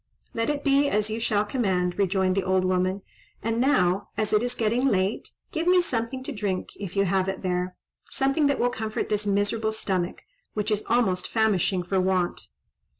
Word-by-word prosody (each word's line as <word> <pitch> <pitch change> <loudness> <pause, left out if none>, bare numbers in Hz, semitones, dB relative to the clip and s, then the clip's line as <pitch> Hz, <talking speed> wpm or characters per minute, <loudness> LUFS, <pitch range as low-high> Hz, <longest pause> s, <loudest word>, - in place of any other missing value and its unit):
"Let 230 +2 0
it 290 -1 -1
be 280 0 +3
as 210 -2 0
you 220 - -2
shall 215 -2 +1
command," 190 -6 0
rejoined 190 -1 +2
the 195 - +1
old 185 0 +1
woman; 185 +1 0 0.4
"and 230 +1 0
now, 195 -8 +2
as 215 0 -1
it 210 - +4
is 245 +1 -1
getting 235 +4 +1
late, 195 -3 0 0.2
give 325 +2 -2
me 365 0 +6
something 260 -5 -2
to 290 - -5
drink, 205 -6 -2
if 195 -2 -7
you 195 0 +3
have 190 +1 +1
it 190 0 -5
there—something 185 - -1
that 280 - +1
will 245 +1 +1
comfort 220 -2 -3
this 210 -1 0
miserable 205 +2 +1
stomach, 190 -5 -2 0.3
which 210 +1 -1
is 210 0 +1
almost 225 -6 +1
famishing 200 -4 +1
for 185 +2 0
want." 185 -1 0
210 Hz, 185 wpm, -26 LUFS, 185-235 Hz, 0.4 s, me